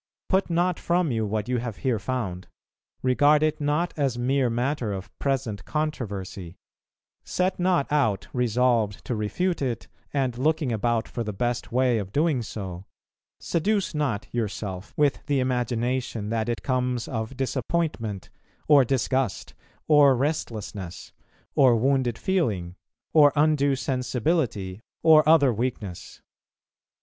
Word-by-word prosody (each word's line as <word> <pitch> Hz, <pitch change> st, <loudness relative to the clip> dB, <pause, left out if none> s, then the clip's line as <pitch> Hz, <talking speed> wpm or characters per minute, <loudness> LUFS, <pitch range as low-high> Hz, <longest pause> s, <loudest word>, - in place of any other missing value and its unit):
Put 190 Hz, -1 st, +2 dB
not 175 Hz, +1 st, +1 dB
from 175 Hz, -3 st, +1 dB
you 110 Hz, -2 st, 0 dB
what 105 Hz, +1 st, -2 dB
you 125 Hz, -1 st, 0 dB
have 115 Hz, -3 st, -5 dB
here 125 Hz, -5 st, 0 dB
found; 100 Hz, -6 st, -3 dB, 0.6 s
regard 145 Hz, +4 st, +4 dB
it 155 Hz, 0 st, 0 dB
not 150 Hz, +4 st, 0 dB
as 135 Hz, -6 st, 0 dB
mere 130 Hz, +1 st, +1 dB
matter 120 Hz, -1 st, -1 dB
of 95 Hz, -1 st, -7 dB
present 115 Hz, -8 st, -1 dB
controversy; 100 Hz, -, -4 dB, 0.7 s
set 185 Hz, 0 st, -1 dB
not 180 Hz, -5 st, +2 dB
out 115 Hz, -10 st, +1 dB
resolved 120 Hz, -3 st, +1 dB
to -, -, -2 dB
refute 155 Hz, -, -1 dB
it, 120 Hz, -4 st, -2 dB, 0.2 s
and 130 Hz, -4 st, -1 dB
looking 155 Hz, -1 st, +1 dB
about 115 Hz, +1 st, 0 dB
for 120 Hz, -, -4 dB
the 105 Hz, -, -3 dB
best 120 Hz, +3 st, -2 dB
way 125 Hz, -1 st, +2 dB
of 100 Hz, -2 st, -6 dB
doing 150 Hz, 0 st, +1 dB
so; 95 Hz, -5 st, -6 dB, 0.5 s
seduce 200 Hz, +4 st, 0 dB
not 140 Hz, -9 st, -1 dB
yourself 105 Hz, -4 st, -4 dB
with 145 Hz, -2 st, +2 dB
the 145 Hz, -2 st, +2 dB
imagination 125 Hz, -3 st, -1 dB
that 115 Hz, 0 st, -1 dB
it 120 Hz, -, -3 dB
comes 125 Hz, -2 st, -1 dB
of 115 Hz, +2 st, -4 dB
disappointment, 130 Hz, -, -2 dB, 0.4 s
or 145 Hz, -3 st, +7 dB
disgust, 130 Hz, -2 st, -1 dB, 0.3 s
or 145 Hz, -3 st, +6 dB
restlessness, 110 Hz, -, -4 dB, 0.4 s
or 130 Hz, -4 st, +5 dB
wounded 125 Hz, -1 st, +1 dB
feeling, 105 Hz, -, -1 dB, 0.4 s
or 145 Hz, -2 st, +7 dB
undue 145 Hz, -2 st, +3 dB
sensibility, 125 Hz, -, -1 dB, 0.2 s
or 160 Hz, -1 st, +8 dB
other 145 Hz, -6 st, +5 dB
weakness. 110 Hz, -6 st, -5 dB
125 Hz, 130 wpm, -25 LUFS, 110-145 Hz, 0.7 s, or